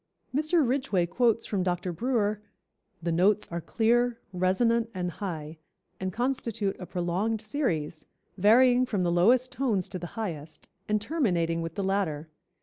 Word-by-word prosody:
Mr. 310 -1 +2
Ridgway 245 -9 +1
quotes 230 +4 +1
from 200 -3 -1
Dr. 180 0 -1
Brewer: 215 0 0 0.6
"The 170 - 0
notes 190 +5 +3
are 170 0 -3
clear, 240 +4 +2 0.2
resonant 225 +6 +2
and 180 -1 -2
high, 160 -4 -6 0.4
and 185 0 -2
constitute 230 -4 -1
a 180 - -7
prolonged 185 +5 -1
series, 195 - -2 0.3
varying 245 +6 +5
from 200 -6 0
the 175 - +1
lowest 240 +9 +4
tones 220 -9 0
to 185 - -5
the 175 - -6
highest, 160 -8 -5 0.2
and 210 0 +2
terminating 180 - 0
with 165 -1 -5
the 200 - -2
latter. 175 -6 -1
200 Hz, 145 wpm, -28 LUFS, 175-235 Hz, 0.6 s, varying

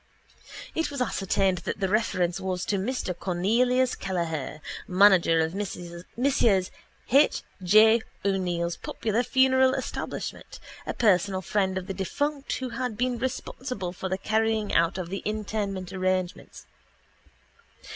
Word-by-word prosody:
_ - - -29 0.3
It 325 - -1
was 285 -2 -5
ascertained 195 -5 +1
that - - -4
the 195 - +1
reference 185 -4 0
was 185 -1 -2
to 200 - 0
Mr 200 -3 -2
Cornelius 235 +9 +1
Kelleher, 165 -6 -3 0.3
manager 180 -4 +5
of 160 +1 -1
Messrs 175 -3 -6 1.1
H. 280 +4 +4 0.2
J. 215 +5 +6 0.2
O'Neill's 175 -3 0
popular 225 +1 -1
funeral 260 +1 +4
establishment, - - -5 0.3
a - - -3
personal 190 -3 +2
friend 190 -2 0
of 185 - -4
the 195 - -4
defunct, 285 +9 -2
who 260 -1 -3
had 235 -2 -3
been 250 0 0
responsible 250 -6 -4
for 190 +1 -5
the 190 - -1
carrying 220 +1 0
out 165 +2 +3
of 180 -2 -4
the 195 - -2
interment 205 -3 -3
arrangements. 185 -1 -2
195 Hz, 130 wpm, -27 LUFS, 180-235 Hz, 1.1 s, J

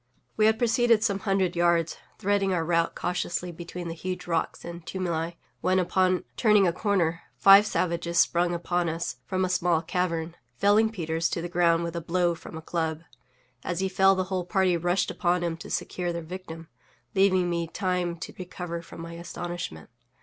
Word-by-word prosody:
We 215 0 +4
had 220 0 +3
proceeded 235 -1 +3
some 200 -2 +1
hundred 190 -3 0
yards, 170 -1 +2 0.2
threading 200 0 +1
our 165 -2 0
route 170 0 +1
cautiously 180 0 -2
between 175 +1 -7
the 165 - -4
huge 180 +2 -5
rocks 165 -2 -2
and 170 0 -7
tumuli, 170 -2 -3 0.2
when, 185 +1 +2
upon 185 0 +2
turning 210 -4 +4
a 170 - +2
corner, 175 -4 0 0.2
five 200 +2 +8
savages 170 -3 -1
sprung 175 +1 +3
upon 175 0 0
us 165 -4 -3
from 185 0 0
a - - 0
small 175 -3 +1
cavern, 170 -1 -2 0.2
felling 210 +2 +4
Peters 165 -5 -1
to - - -2
the - - -2
ground 170 -1 +3
with 170 0 -4
a 170 - -2
blow 175 +1 +1
from 160 - -9
a 160 - -9
club. 160 -1 -2 0.6
As 175 -1 -2
he 190 - +1
fell 195 0 +4
the 185 - 0
whole 185 -1 0
party 190 -2 +2
rushed 175 +3 0
upon 175 -1 0
him 170 -1 -1
to 165 - -10
secure 175 -1 -2
their 170 -1 -4
victim, 165 -1 -8 0.5
leaving 185 -2 +3
me 170 -1 -1
time 180 -1 -1
to - - -6
recover 180 -2 -5
from 165 - -11
my 165 0 -7
astonishment. 170 - -6
175 Hz, 185 wpm, -27 LUFS, 170-185 Hz, 0.6 s, five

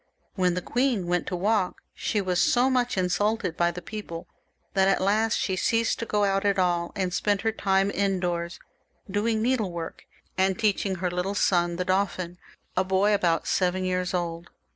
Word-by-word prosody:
When 180 -2 +1
the 180 - -3
queen 245 -7 0
went 175 0 0
to 180 - -2
walk, 195 0 +1 0.2
she 210 - -1
was 185 -2 +1
so 250 +2 +3
much 250 -3 +1
insulted 185 +1 0
by 170 0 +2
the 180 +1 -7
people 170 -5 -7 0.5
that 190 -1 +3
at 195 - +3
last 215 +3 +2
she 190 - -1
left 230 +6 +1
off 230 - -3
going 205 -1 +2
out 195 0 0
at 200 -1 +2
all, 175 -2 +1
and 185 -3 -1
spent 205 0 +1
her 225 - +1
time 195 -2 +1
indoors, 180 -4 -1 0.5
doing 215 +3 0
needlework 200 -10 -2 0.3
and 190 0 +2
teaching 205 -3 +1
her 180 0 -2
little 180 +3 -2
son, 175 -3 +2
the 180 +1 -2
Dauphin, 185 -2 -1 0.4
a 185 - +3
boy 190 +2 +2
of 205 - +2
about 165 -2 +1
seven 185 0 +1
years 180 -1 -1
old. 170 -1 -3
190 Hz, 185 wpm, -26 LUFS, 180-205 Hz, 0.5 s, so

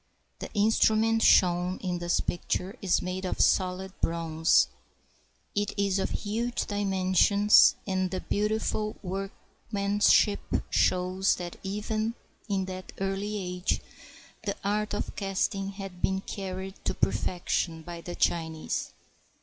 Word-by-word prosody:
The - - -7
instrument 220 +1 +3
shown 180 -1 +4
in 180 -2 -3
this 175 0 +1
picture 180 +3 -2
is 195 -4 +2
made 185 +1 -3
of 185 - -3
solid 185 0 +2
bronze. 165 0 +3 0.9
It 205 0 -1
is 200 -1 +1
of - - 0
huge 230 +3 -2
dimensions, 200 +1 +4
and 185 -1 0
the 185 - -3
beautiful 215 0 -1
workman 200 +2 -4
ship 205 0 +5 0.3
shows 185 +1 +2
that 175 -1 -7
even 215 +3 -2 0.3
in 195 -2 0
that 185 0 -7
early 195 +2 -2
age 180 -1 -1 0.6
the 200 -2 -2
art 210 +1 0
of - - -4
casting 195 0 -1
had 195 -2 -8
been 190 0 +1
carried 190 -1 -6
to - - 0
perfection 170 -2 -1
by 170 0 -7
the 175 +1 -7
Chinese. 160 -2 -1
195 Hz, 125 wpm, -28 LUFS, 180-205 Hz, 0.9 s, ship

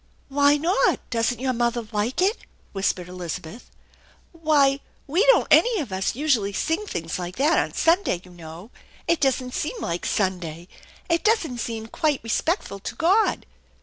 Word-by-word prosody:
"Why 285 +1 +4
not? 340 +7 +2
Doesn't 230 0 0
your 260 0 0
mother 235 -1 -1
like 220 - 0
it?" 405 +4 +3 0.4
whispered 190 -2 -1
Elizabeth. 180 +3 -7 0.6
"Why, 295 -5 +2 0.3
we 330 +8 +2
don't - - +6
any 470 -3 +5
of 270 - -4
us 190 +2 -1
usually 245 -9 +1
sing 325 - -1
things 165 - -4
like 180 0 -5
that 295 +7 +3
on - - -2
Sunday, 335 - +2
you 180 - -15
know. 170 +5 -11 0.4
It 340 - +1
doesn't 260 -2 0
seem 450 +10 -3
like 170 - -3
Sunday. 175 -4 -2 0.4
It 335 -1 +1
doesn't 355 - +1
seem 225 -1 -4
quite 290 +5 -1
respectful 230 - -1
to - - -6
God." 385 +7 +2
250 Hz, 155 wpm, -24 LUFS, 195-325 Hz, 0.6 s, don't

